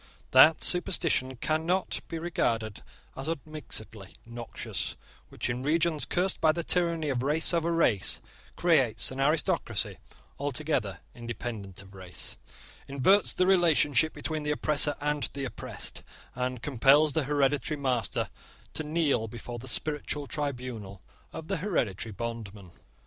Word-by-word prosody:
That 155 Hz, +5 st, +7 dB
superstition 165 Hz, -7 st, +2 dB
cannot 160 Hz, +8 st, 0 dB
be 165 Hz, -, -4 dB
regarded 115 Hz, -, -1 dB, 0.3 s
as 135 Hz, +3 st, -5 dB
unmixedly 135 Hz, -, -5 dB
noxious 115 Hz, 0 st, -5 dB, 0.3 s
which, -, -, -3 dB
in 120 Hz, +1 st, -2 dB
regions 160 Hz, +2 st, +1 dB
cursed 185 Hz, +2 st, 0 dB
by 160 Hz, -1 st, +5 dB
the 170 Hz, +1 st, -2 dB
tyranny 170 Hz, -3 st, +1 dB
of 130 Hz, -3 st, 0 dB
race 150 Hz, +6 st, +2 dB
over 170 Hz, 0 st, +1 dB
race, 140 Hz, -, +2 dB, 0.4 s
creates 140 Hz, -12 st, +3 dB
an 130 Hz, -, -6 dB
aristocracy 150 Hz, +3 st, +1 dB, 0.4 s
altogether 135 Hz, -, -2 dB
independent 115 Hz, -5 st, -6 dB
of 95 Hz, 0 st, -16 dB
race, 95 Hz, -2 st, -5 dB, 0.5 s
inverts 140 Hz, +10 st, +3 dB
the 185 Hz, -, +3 dB
relation 175 Hz, -6 st, +4 dB, 0.2 s
between 155 Hz, -1 st, -3 dB
the 150 Hz, -, -3 dB
oppressor 150 Hz, 0 st, +3 dB
and 150 Hz, -1 st, 0 dB
the 140 Hz, -1 st, -3 dB
oppressed, 130 Hz, -, -5 dB, 0.3 s
and 125 Hz, -1 st, -3 dB
compels 145 Hz, +3 st, +5 dB
the 155 Hz, -1 st, +1 dB
hereditary 145 Hz, +1 st, +1 dB
master 125 Hz, -7 st, -1 dB, 0.4 s
to 155 Hz, -, -2 dB
kneel 150 Hz, -7 st, +1 dB
before 120 Hz, +2 st, -7 dB
the 130 Hz, -, -7 dB
spiritual 150 Hz, +3 st, 0 dB
tribunal 125 Hz, -, -4 dB, 0.3 s
of 160 Hz, -, -8 dB
the -, -, -1 dB
hereditary 120 Hz, -, -1 dB
bondman. 105 Hz, -4 st, -6 dB
140 Hz, 130 wpm, -29 LUFS, 120-160 Hz, 0.5 s, That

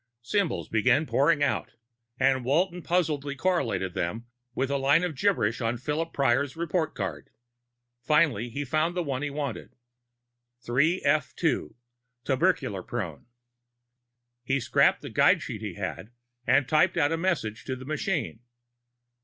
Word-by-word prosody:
Symbols 200 Hz, -, -1 dB
began 125 Hz, +7 st, +2 dB
pouring 145 Hz, 0 st, +2 dB
forth, 145 Hz, -, -1 dB, 0.4 s
and 130 Hz, -1 st, +3 dB
Walton 175 Hz, +7 st, +1 dB
puzzledly 150 Hz, -5 st, 0 dB
correlated 110 Hz, -, 0 dB
them 105 Hz, +5 st, -3 dB, 0.3 s
with 135 Hz, 0 st, 0 dB
the 140 Hz, 0 st, 0 dB
line 140 Hz, +5 st, +4 dB
of 180 Hz, -3 st, -1 dB
gibberish 130 Hz, -, +1 dB
on 115 Hz, +1 st, 0 dB
Phillip 155 Hz, +6 st, -2 dB
Prior's 135 Hz, 0 st, +1 dB
record 165 Hz, -1 st, -1 dB
card. 85 Hz, -8 st, -5 dB, 0.7 s
Finally 140 Hz, -4 st, +2 dB
he 145 Hz, +5 st, -4 dB
found 155 Hz, +6 st, 0 dB
the 175 Hz, -, +1 dB
one 135 Hz, -3 st, -3 dB
he 145 Hz, -, -2 dB
wanted: 140 Hz, -4 st, -5 dB, 0.9 s
3f2, 140 Hz, -, +1 dB, 0.5 s
tubercular 135 Hz, -, +1 dB
prone. 90 Hz, -6 st, -5 dB, 1.2 s
He 135 Hz, +3 st, 0 dB
scrapped 115 Hz, -, +3 dB
the -, -, -7 dB
guide -, -, +4 dB
sheet -, -, -6 dB
he -, -, -5 dB
had -, -, -5 dB, 0.4 s
and 130 Hz, +1 st, +4 dB
typed 160 Hz, +4 st, +3 dB
out 145 Hz, -2 st, +3 dB
a -, -, +2 dB
message 165 Hz, -, -1 dB
to 130 Hz, -, -3 dB
the 130 Hz, 0 st, -10 dB
machine. 155 Hz, -, -2 dB
140 Hz, 135 wpm, -27 LUFS, 120-160 Hz, 1.2 s, line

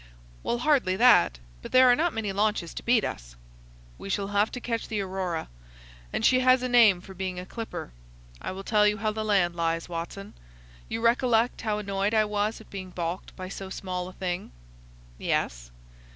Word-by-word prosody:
"Well, 240 Hz, -, -1 dB
hardly 245 Hz, -8 st, +2 dB
that. 235 Hz, -, +5 dB, 0.2 s
But -, -, -9 dB
there 255 Hz, 0 st, +7 dB
are 245 Hz, -, +7 dB
not 335 Hz, +5 st, +1 dB
many 215 Hz, -3 st, -3 dB
launches 205 Hz, -4 st, 0 dB
to -, -, -6 dB
beat 235 Hz, -3 st, +3 dB
us." -, -, -6 dB, 0.6 s
"We -, -, -7 dB
shall 195 Hz, 0 st, -1 dB
have 205 Hz, +1 st, +2 dB
to 250 Hz, -, -4 dB
catch 230 Hz, -2 st, -3 dB
the 215 Hz, -, -2 dB
Aurora, 185 Hz, -4 st, -3 dB, 0.6 s
and -, -, -1 dB
she 255 Hz, -, +5 dB
has 255 Hz, 0 st, +4 dB
a -, -, 0 dB
name 225 Hz, -7 st, +5 dB
for 190 Hz, -, -11 dB
being 185 Hz, -1 st, -4 dB
a 180 Hz, -, -7 dB
clipper. 225 Hz, -, -6 dB, 0.5 s
I -, -, -4 dB
will 190 Hz, +1 st, -7 dB
tell 210 Hz, 0 st, +3 dB
you 210 Hz, 0 st, +1 dB
how 215 Hz, -1 st, 0 dB
the 215 Hz, 0 st, -3 dB
land 190 Hz, -5 st, +2 dB
lies, 165 Hz, 0 st, -1 dB
Watson. 175 Hz, +3 st, -6 dB, 0.6 s
You 225 Hz, -, -3 dB
recollect 235 Hz, 0 st, +2 dB
how 215 Hz, -2 st, -1 dB
annoyed 200 Hz, +1 st, -1 dB
I 215 Hz, -1 st, +4 dB
was 210 Hz, +1 st, -1 dB
at 220 Hz, -, -16 dB
being 190 Hz, -2 st, -6 dB
balked 175 Hz, 0 st, -5 dB
by 185 Hz, -1 st, -6 dB
so 195 Hz, 0 st, -7 dB
small 180 Hz, -1 st, -4 dB
a 185 Hz, -, -10 dB
thing?" 180 Hz, -1 st, -4 dB, 0.7 s
"Yes." -, -, -1 dB
205 Hz, 195 wpm, -27 LUFS, 185-225 Hz, 0.7 s, there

